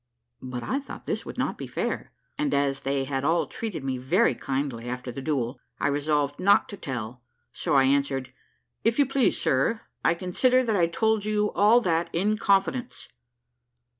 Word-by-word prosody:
But 125 -2 -5
I 270 - -1
thought 285 - -10
this - - -3
would - - -7
not - - -2
be - - -5
fair; - - -3 0.2
and 295 -2 0
as 140 -1 +1
they 135 0 0
had 135 0 -2
all 165 +3 +2
treated 210 -11 -5
me 130 -2 -2
very 180 - +3
kindly 130 -3 -3
after 125 0 -5
the 135 - -6
duel, 130 -4 -2 0.2
I - - +1
resolved 145 0 0
not 200 +2 +4
to - - -6
tell; 125 - -5 0.3
so 155 -5 -1
I 135 - +6
answered, 135 -1 +1 0.5
"If 230 +1 +2
you 285 - +5
please, 270 -2 +2
sir, 140 - +1 0.2
I 165 - +3
consider 250 +9 +2
that 225 -3 0
I 175 -3 +3
told 220 +4 +1
you 210 0 0
all 220 +4 +5
that 170 -5 0
in 210 +5 +1
confidence." 205 +6 0
155 Hz, 180 wpm, -26 LUFS, 135-215 Hz, 0.5 s, I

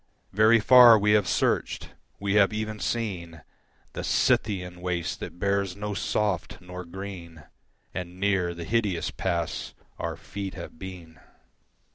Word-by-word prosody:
Very 110 +3 +5
far 120 0 +9
we 105 0 +2
have 105 -3 +4
searched; - - 0 0.3
we 100 0 -1
have 100 -1 +5
even 110 0 -4
seen 90 -10 -3 0.5
The - - -5
Scythian 90 -4 +1
waste 90 -2 -2
that - - -7
bears 100 -1 0
no 105 +1 -4
soft 105 0 -1
nor 90 0 -8
green, 85 -3 -8 0.5
And 90 0 -6
near 95 -3 +1
the 85 - -6
Hideous 105 -6 0
Pass 85 -3 -3 0.2
our - - -3
feet 95 +6 -6
have - - -9
been. 85 -5 -9
95 Hz, 135 wpm, -26 LUFS, 90-105 Hz, 0.5 s, far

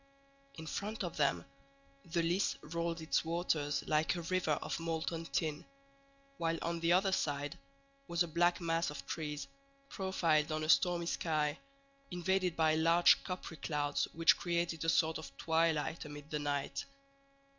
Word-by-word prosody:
In 160 - -8
front 205 +6 -3
of 175 -2 -4
them 140 -2 +1 0.6
the 170 0 -1
Lys 175 +4 +1
rolled 170 +1 -3
its 160 - +1
waters 160 -3 0
like 155 +3 +2
a 170 - -4
river 180 -2 +1
of - - -3
molten 165 0 -2
tin; 155 -2 -1 0.8
while 165 0 0
on 170 0 -1
the 170 +1 +2
other 190 +2 +4
side 145 -5 -1 0.5
was 170 +1 +2
a - - -4
black 175 +2 +2
mass 165 -1 0
of 150 - -7
trees, 150 -3 -4 0.4
profiled 165 -6 +1
on 155 0 -1
a 155 - -3
stormy 175 0 +4
sky, 155 -3 0 0.5
invaded 180 0 0
by 160 -1 +3
large 165 +2 +5
coppery 180 -3 -6
clouds 145 -2 0
which 165 +1 +5
created 170 -2 -1
a 165 - +1
sort 160 0 +2
of 160 - -10
twilight 160 -1 +1
amid 145 -1 -10
the 150 - -1
night. 145 -1 -2
165 Hz, 155 wpm, -34 LUFS, 155-170 Hz, 0.8 s, large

